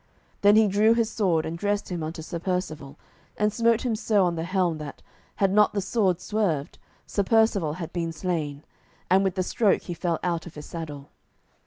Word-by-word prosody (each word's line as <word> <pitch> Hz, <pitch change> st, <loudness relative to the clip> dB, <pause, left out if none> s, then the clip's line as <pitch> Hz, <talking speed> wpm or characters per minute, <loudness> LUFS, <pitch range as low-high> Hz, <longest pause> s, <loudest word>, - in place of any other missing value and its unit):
Then 205 Hz, +1 st, +6 dB
he 220 Hz, 0 st, +6 dB
drew 210 Hz, +3 st, +4 dB
his 230 Hz, -1 st, +1 dB
sword, 175 Hz, -7 st, +1 dB
and 160 Hz, -, -4 dB
dressed 205 Hz, +4 st, -1 dB
him 175 Hz, -2 st, -3 dB
unto 160 Hz, +1 st, -5 dB
Sir 170 Hz, +1 st, -5 dB
Percivale, 160 Hz, -6 st, -3 dB, 0.4 s
and 210 Hz, 0 st, +1 dB
smote 230 Hz, 0 st, +2 dB
him 235 Hz, -3 st, +1 dB
so 210 Hz, -3 st, +2 dB
on 175 Hz, -, +1 dB
the 165 Hz, -1 st, -3 dB
helm 180 Hz, -3 st, 0 dB
that, 150 Hz, -2 st, -8 dB, 0.3 s
had 195 Hz, -1 st, +2 dB
not 210 Hz, 0 st, +4 dB
the -, -, +2 dB
sword 190 Hz, -3 st, +1 dB
swerved, 185 Hz, -9 st, -2 dB, 0.3 s
Sir 205 Hz, -, -1 dB
Percivale 200 Hz, -6 st, +2 dB
had 165 Hz, -1 st, -7 dB
been 170 Hz, -2 st, -2 dB
slain, 155 Hz, -4 st, -3 dB, 0.5 s
and 190 Hz, +1 st, +5 dB
with 190 Hz, -2 st, 0 dB
the 185 Hz, -, 0 dB
stroke 205 Hz, +2 st, +1 dB
he 175 Hz, -, -5 dB
fell 170 Hz, 0 st, -1 dB
out 170 Hz, -2 st, -1 dB
of 170 Hz, -, -11 dB
his 150 Hz, -1 st, -8 dB
saddle. 150 Hz, -4 st, -7 dB
180 Hz, 200 wpm, -26 LUFS, 160-205 Hz, 0.5 s, Then